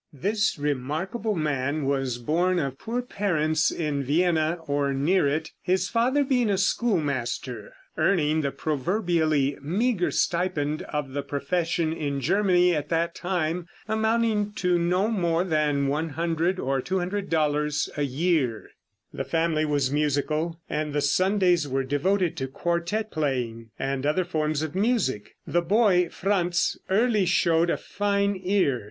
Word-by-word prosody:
This 205 - 0
remarkable 150 - -2
man 145 -2 -1
was 135 -3 0
born 175 +9 +1
of 135 -5 -2
poor 245 +2 -3
parents 160 -9 +1
in 150 -4 -2
Vienna, 160 +3 +1
or 140 -2 0
near 150 +4 +2
it, 155 +3 -2
his 185 0 0
father 250 +6 +2
being 250 -5 +1
a 195 - +2
schoolmaster, 140 - -1 0.2
earning 155 -4 +2
the 140 - 0
proverbially 155 - 0
meager 190 - 0
stipend 165 -4 0
of 150 -3 -3
the 145 - -1
profession 160 +4 -1
in 145 -3 -2
Germany 180 +2 +3
at 150 -2 -2
that 170 0 0
time, 175 -2 -2 0.2
amounting 220 -1 +1
to 180 -3 +1
no 180 +4 +1
more 175 -6 +1
than 150 -5 +1
$100 165 +4 -1
or 135 -4 -1
$200 160 -5 0
a 150 - -2
year. 140 -4 0 0.4
The 135 - -3
family 160 0 0
was 145 -3 0
musical, 150 +3 0
and 150 -1 -2
the 145 - +1
Sundays 180 +1 +2
were 135 0 -1
devoted 175 +6 0
to 135 -3 -2
quartette 175 +9 -2
playing 125 -7 -2
and 135 0 -2
other 175 +5 +1
forms 155 -3 -1
of 155 -1 -4
music. 190 - 0
The 175 - +1
boy 180 -1 +3
Franz 180 -3 0
early 210 -1 +2
showed 170 -1 +3
a - - +1
fine 200 0 0
ear. 180 -9 +2
165 Hz, 135 wpm, -25 LUFS, 145-185 Hz, 0.4 s, Germany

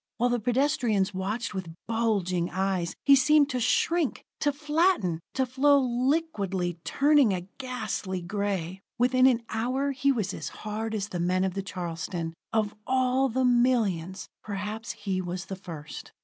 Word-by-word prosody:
While 245 +1 +2
the 245 - +1
pedestrians 235 -5 +1
watched 205 +5 -3
with 180 -4 -5
bulging 200 -7 0
eyes, 190 -2 -1
he 280 - +8
seemed 290 +2 +5
to 255 - -1
shrink, 305 +5 +1
to 290 - +2
flatten, 295 - +1 0.2
to 265 - +2
flow 280 +3 +4
liquidly, 240 - 0
turning 285 -6 +4
a 175 -1 -5
ghastly 220 -7 -3
gray. 190 -1 -3 0.2
Within 255 +1 +4
an 240 -3 +2
hour 255 +5 0
he 275 +1 +2
was 220 -8 -1
as - - -5 0.2
hard 220 +1 -3
as 205 -1 -3
the 175 - -4
men 180 +2 +1
of 190 -1 0
the 195 - -2
Charleston. 170 -2 -4 0.2
Of 215 -2 0
all 260 +1 +2
the 255 +2 +1
millions, 225 -8 +1
perhaps 215 +3 -5
he 195 -3 -2
was 180 0 -4
the 190 - -5
first. 165 -5 -9
220 Hz, 155 wpm, -27 LUFS, 185-255 Hz, 0.2 s, he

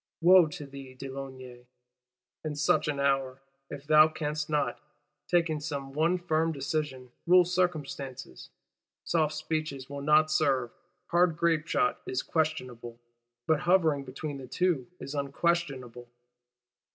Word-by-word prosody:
Wo 175 0 +7
to 150 -1 -8
thee, 135 -2 -11
de 135 +1 -7
Launay, 130 -2 -9 0.8
in 155 -1 -3
such 150 +1 +2
an 145 -2 -1
hour, 135 -1 0 0.3
if 140 - -8
thou 155 +1 +7
canst 150 -1 -3
not, 150 -1 0 0.5
taking 165 -3 +1
some 140 -3 -5
one 165 +5 +2
firm 165 -2 0
decision, 135 -3 -3 0.2
rule 180 0 +7
circumstances! 145 - -3 0.5
Soft 155 -2 +1
speeches 155 -4 -4
will 140 0 -5
not 155 +2 +4
serve; 135 -6 +1 0.4
hard 175 -2 +3
grape 165 -2 +1
shot 310 - +1
is 380 0 -2
questionable; 130 -7 -2 0.5
but 160 -2 +2
hovering 160 -6 +2
between 140 +2 -6
the 130 - -9
two 160 -2 0
is 140 - -7
_un_questionable. 140 -4 -2
150 Hz, 130 wpm, -29 LUFS, 135-160 Hz, 0.8 s, Wo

